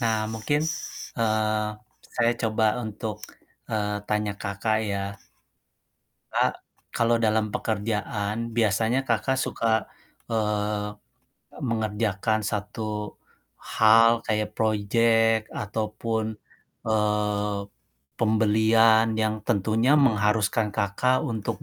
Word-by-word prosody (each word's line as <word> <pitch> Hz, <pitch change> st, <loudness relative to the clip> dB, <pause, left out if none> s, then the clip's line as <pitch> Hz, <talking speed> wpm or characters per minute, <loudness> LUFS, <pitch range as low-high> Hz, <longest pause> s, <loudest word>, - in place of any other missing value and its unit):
Nah 110 Hz, -2 st, +1 dB
mungkin, 130 Hz, +7 st, 0 dB, 0.6 s
eee, 110 Hz, -1 st, +1 dB, 0.5 s
saya 120 Hz, 0 st, +3 dB
coba 110 Hz, 0 st, +2 dB, 0.2 s
untuk, 110 Hz, 0 st, -5 dB, 0.5 s
eee, 105 Hz, -1 st, -1 dB
tanya 105 Hz, -1 st, 0 dB
Kakak 105 Hz, +2 st, 0 dB
ya. 100 Hz, 0 st, -2 dB, 1.3 s
Kak -, -, +2 dB, 0.4 s
kalau 115 Hz, 0 st, +2 dB
dalam 110 Hz, -1 st, +1 dB
pekerjaan 105 Hz, -1 st, -2 dB, 0.2 s
biasanya 110 Hz, +3 st, +2 dB
Kakak 130 Hz, +4 st, +1 dB
suka, 110 Hz, -5 st, 0 dB, 0.4 s
eee, 105 Hz, -2 st, -1 dB, 0.7 s
mengerjakan 110 Hz, -2 st, -1 dB
1 105 Hz, 0 st, -4 dB, 0.4 s
hal 115 Hz, +1 st, +4 dB
kayak 105 Hz, -1 st, -1 dB
project 115 Hz, +1 st, +2 dB
ataupun, 110 Hz, +1 st, -3 dB, 0.5 s
eee, 105 Hz, -1 st, 0 dB, 0.6 s
pembelian 110 Hz, 0 st, +4 dB
yang 110 Hz, 0 st, 0 dB
tentunya 110 Hz, +7 st, +2 dB
mengharuskan 105 Hz, -4 st, +2 dB
Kakak 110 Hz, +5 st, +1 dB
untuk 115 Hz, -8 st, -3 dB
110 Hz, 85 wpm, -25 LUFS, 105-115 Hz, 1.3 s, hal